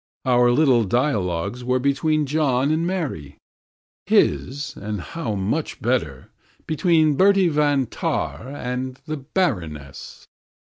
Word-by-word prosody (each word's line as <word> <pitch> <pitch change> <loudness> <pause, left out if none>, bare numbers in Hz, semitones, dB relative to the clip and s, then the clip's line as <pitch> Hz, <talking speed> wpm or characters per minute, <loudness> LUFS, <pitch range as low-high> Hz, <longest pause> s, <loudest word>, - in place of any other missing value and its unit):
Our 125 -1 +4
little 125 -2 +4
dialogues 105 - -1
were 125 +1 +1
between 150 +3 +1
John 140 -2 +1
and 165 +2 0
Mary; 135 - -4 0.7
his, 130 - +1
and 105 0 -5
how 115 - -4
much 105 +11 -2
better, 80 - -2 0.3
between 160 -1 +2
Bertie 195 +1 +4
van 145 -3 +2
Tahn 120 - -3
and 125 0 -4
the 155 -1 -4
Baroness. 90 - -3
130 Hz, 110 wpm, -22 LUFS, 110-155 Hz, 0.7 s, Our